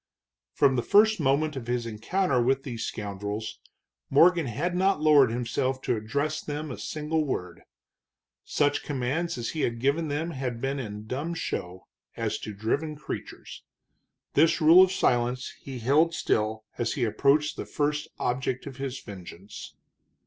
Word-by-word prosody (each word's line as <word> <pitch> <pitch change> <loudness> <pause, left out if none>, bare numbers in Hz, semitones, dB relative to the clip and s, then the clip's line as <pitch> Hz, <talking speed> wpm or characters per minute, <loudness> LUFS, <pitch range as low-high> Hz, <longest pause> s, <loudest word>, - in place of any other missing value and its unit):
From 135 -2 +3
the - - +2
first 215 - +4
moment 150 +1 +1
of 125 -3 -6
his 120 -1 -1
encounter 125 - 0
with 135 +2 +1
these 120 -4 -5
scoundrels 105 +1 -5 0.5
Morgan 170 +2 +5
had 155 +10 -2
not 190 -1 +2
lowered 150 -4 +6
himself 125 +3 -1
to - - +1
address 140 +8 -2
them 150 0 -5
a - - -7
single 155 +1 -1
word. 90 - -4 0.8
Such 145 -1 +1
commands 140 +4 -2
as 120 -1 -3
he 155 - -3
had 115 -1 -1
given 140 +6 +1
them 155 +4 -2
had 130 -5 -4
been 135 +2 -2
in 105 -3 -6
dumb 145 +9 -3
show, 90 - -4 0.3
as - - -2
to 110 - -6
driven 130 +10 -2
creatures. 150 - -7 0.7
This 160 +3 +4
rule 165 +3 +8
of 185 0 +5
silence 125 -5 0
he 135 -2 -7
held 150 +8 +3
still 110 -6 0 0.2
as 120 -1 0
he 135 - -1
approached 140 +6 +2
the - - -6
first 150 0 -1
object 130 +1 -2
of 135 - -8
his 135 -1 -4
vengeance. 95 -1 -10
135 Hz, 155 wpm, -27 LUFS, 115-155 Hz, 0.8 s, rule